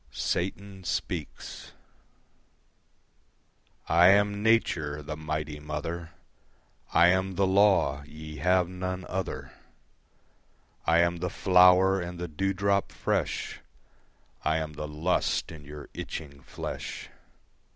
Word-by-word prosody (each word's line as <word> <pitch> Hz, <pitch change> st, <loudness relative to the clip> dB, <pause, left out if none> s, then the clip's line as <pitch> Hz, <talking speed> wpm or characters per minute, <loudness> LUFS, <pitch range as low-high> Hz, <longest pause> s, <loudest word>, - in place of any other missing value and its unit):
Satan 95 Hz, +1 st, -3 dB
Speaks -, -, -4 dB, 2.1 s
I 85 Hz, +1 st, +6 dB
am 100 Hz, +1 st, +4 dB
Nature, 75 Hz, -10 st, +1 dB
the 75 Hz, +1 st, -5 dB
Mighty 75 Hz, -1 st, -4 dB
Mother, 80 Hz, +3 st, -5 dB, 0.8 s
I 85 Hz, +1 st, +6 dB
am 95 Hz, +1 st, +1 dB
the 95 Hz, -, +3 dB
law: 95 Hz, -7 st, +3 dB
ye 75 Hz, 0 st, -9 dB
have 90 Hz, +4 st, +3 dB
none 90 Hz, 0 st, -4 dB
other. 95 Hz, +1 st, -4 dB, 1.4 s
I 85 Hz, +2 st, +5 dB
am 85 Hz, 0 st, +1 dB
the 90 Hz, +1 st, -2 dB
flower 90 Hz, +1 st, +5 dB
and 85 Hz, 0 st, -6 dB
the 90 Hz, 0 st, -4 dB
dewdrop 95 Hz, +4 st, 0 dB
fresh, -, -, -2 dB, 0.8 s
I 80 Hz, -, +2 dB
am 80 Hz, -1 st, -3 dB
the 75 Hz, +1 st, -5 dB
lust 80 Hz, +5 st, 0 dB
in 75 Hz, -2 st, -11 dB
your 75 Hz, 0 st, -9 dB
itching 70 Hz, -2 st, -7 dB
flesh. -, -, -6 dB
85 Hz, 110 wpm, -28 LUFS, 75-95 Hz, 2.1 s, I